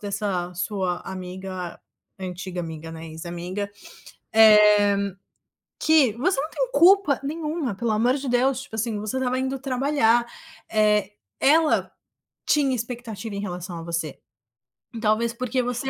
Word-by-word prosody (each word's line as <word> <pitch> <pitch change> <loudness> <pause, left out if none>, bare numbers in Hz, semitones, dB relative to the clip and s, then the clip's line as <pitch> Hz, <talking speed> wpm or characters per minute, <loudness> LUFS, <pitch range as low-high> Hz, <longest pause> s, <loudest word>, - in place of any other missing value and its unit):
dessa 200 -3 -2
sua 180 0 -2
amiga, 185 -1 -6 0.4
antiga 185 0 -6
amiga, 160 -1 -7
né, 165 0 -8
ex-amiga, 175 +5 -5 0.6
eh, 210 -2 +6 0.6
que 310 -8 +4
você 275 - 0
não 305 +3 -2
tem - - -2
culpa 375 - +5
nenhuma, 300 - -3
pelo 230 +3 -1
amor 230 +4 +2
de 275 -2 -4
Deus. 255 +2 +2
Tipo 220 - -10
assim, 220 0 -1
você 210 +4 -3
estava 255 -1 0
indo 265 +1 -2
trabalhar, 255 -3 +2 0.5
eh, 210 -2 +2 0.3
ela 310 +3 +3 0.5
tinha 280 -3 +2
expectativa 230 -3 -6
em 200 - -3
relação 180 -3 -5
a - - -7
você 165 -3 -3 0.8
talvez 225 +2 +1
porque 255 +1 -1
você 245 +2 -3
215 Hz, 130 wpm, -24 LUFS, 185-260 Hz, 0.8 s, eh